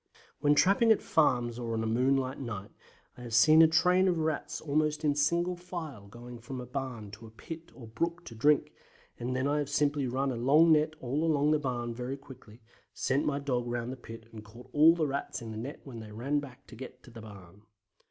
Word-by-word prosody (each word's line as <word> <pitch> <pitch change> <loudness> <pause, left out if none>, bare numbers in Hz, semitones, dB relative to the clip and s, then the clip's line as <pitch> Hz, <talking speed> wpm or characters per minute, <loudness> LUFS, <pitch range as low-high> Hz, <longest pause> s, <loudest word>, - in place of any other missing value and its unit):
When 145 0 +3
trapping 200 +8 +4
at 220 - +5
farms 120 -6 +1
on 115 -2 -2
a - - -2
moonlight 130 +3 +1
night 110 -7 -6 0.5
I - - -10
have 120 -2 -4
seen 155 +6 +7
a 165 - +8
train 180 +4 +3
of 180 -2 +1
Rats 160 -1 -2
almost 150 +1 0
in 145 - +3
single 170 +5 +1
file 165 - -8
going 120 +3 -11
from 130 +2 -7
a 125 - -6
barn 125 -5 -5
to 110 +2 -11
a - - -12
pit 160 +9 -10
or 125 - -11
brook 170 +10 -3
to - - -9
drink, 145 +6 +2 0.5
and 125 +2 -3
then 130 +2 0
I 145 +1 +1
have 145 -2 -3
simply 145 -2 +1
run 135 +2 -1
a - - -3
long 145 +8 +4
net 155 0 +3
all 135 +5 -1
along 150 -2 +2
the 155 - +3
barn 120 -4 -3
very 125 +3 -5
quickly, 130 -5 -15 0.3
sent 135 +2 0
my 145 -1 0
dog 125 -4 -2
round 120 0 -3
the - - -5
pit 115 -3 -11
and 110 -1 -10
caught 115 +4 -15
all 155 +3 +6
the 165 -2 0
Rats 140 -1 -3
in 115 -2 -8
the 110 - -7
net 135 +6 -7
when 125 -5 -9
they 110 -1 -10
ran 135 +7 -1
back 135 -4 -11
to 120 - -13
get 125 +1 -10
in 120 - -15
the 115 - -10
barn. 100 -3 -13
135 Hz, 225 wpm, -30 LUFS, 120-150 Hz, 0.5 s, a